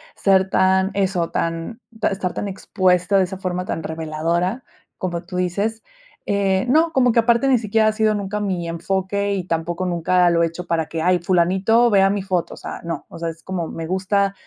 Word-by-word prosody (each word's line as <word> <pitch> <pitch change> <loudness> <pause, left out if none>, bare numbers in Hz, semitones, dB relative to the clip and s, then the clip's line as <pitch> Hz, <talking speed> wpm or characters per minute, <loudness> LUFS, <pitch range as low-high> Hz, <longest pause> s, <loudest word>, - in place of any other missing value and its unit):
ser 190 -1 +3
tan, 190 +1 +3
eso 185 -4 0
tan 165 +7 -3 0.2
ta - - +1
estar 190 -2 -3
tan - - -3
expuesta 185 0 +1
de 190 - +4
esa 190 +1 -7
forma 180 -1 -3
tan 165 - -4
reveladora, 165 +7 -2 0.3
como 175 -2 -3
tú 180 +1 -6
dices, 200 +5 -1 0.4
eh, 195 0 +1
no, 320 +5 +3
como 250 -5 +3
que 230 - +3
aparte 235 +3 +3
ni 265 -2 +4
siquiera 220 0 +2
ha - - +4
sido 215 -1 +2
nunca 205 0 -3
mi 185 -4 -2
enfoque 190 +4 -1
y 190 -3 -3
tampoco 170 +1 -2
nunca 180 0 +2
lo 170 -1 +2
he - - +3
hecho 170 +2 -7
para 165 -2 -1
que, 165 - -4
ay, 180 +2 +3
fulanito 190 +7 +3
vea 195 -2 +4
mi 200 0 -1
foto, 185 -3 -2
o - - -18
sea, - - -7
no, 170 0 -5
o - - -10
sea, 170 0 -2
es 165 0 -10
como 180 -3 -3
me 165 - -6
gusta 195 +3 0
185 Hz, 205 wpm, -21 LUFS, 170-200 Hz, 0.4 s, de